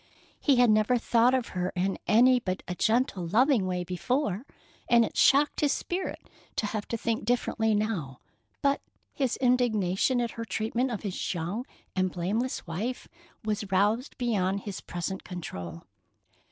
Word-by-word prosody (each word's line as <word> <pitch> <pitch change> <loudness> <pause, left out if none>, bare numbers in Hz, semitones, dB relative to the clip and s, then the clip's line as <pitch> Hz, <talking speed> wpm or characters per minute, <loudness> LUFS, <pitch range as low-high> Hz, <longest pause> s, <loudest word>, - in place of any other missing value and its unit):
He 280 - +3
had 245 -2 +5
never 215 +3 +3
thought 240 +2 +3
of 255 -3 -1
her 180 0 -2
in 190 +2 0
any 250 +4 +6
but 185 -5 -3
a 180 - -2
gentle, 220 -3 +1
loving 230 - +3
way 180 -1 -1
before, 195 - -1 0.4
and 235 -1 +6
it - - -7
shocked 285 +2 +4
his 290 -2 +3
spirit 365 +2 -4 0.3
to - - 0
have 210 0 -3
to 230 - -2
think 225 0 -1
differently 220 -1 +1
now; 185 - -2 0.4
but 280 0 +2 0.3
his 265 -4 0
indignation 245 -3 +2
at 235 -1 -1
her 230 - -5
treatment 230 +3 -1
of 230 -3 -4
his 195 -2 -3
young 180 +10 -3 0.3
and 185 -1 +1
blameless 205 +9 -2
wife 210 +10 -4 0.4
was 210 -2 -2
roused 210 +7 +1
beyond 200 -6 0
his 195 -1 -6
present 180 +2 -4
control. 90 - -7
220 Hz, 155 wpm, -28 LUFS, 185-245 Hz, 0.4 s, any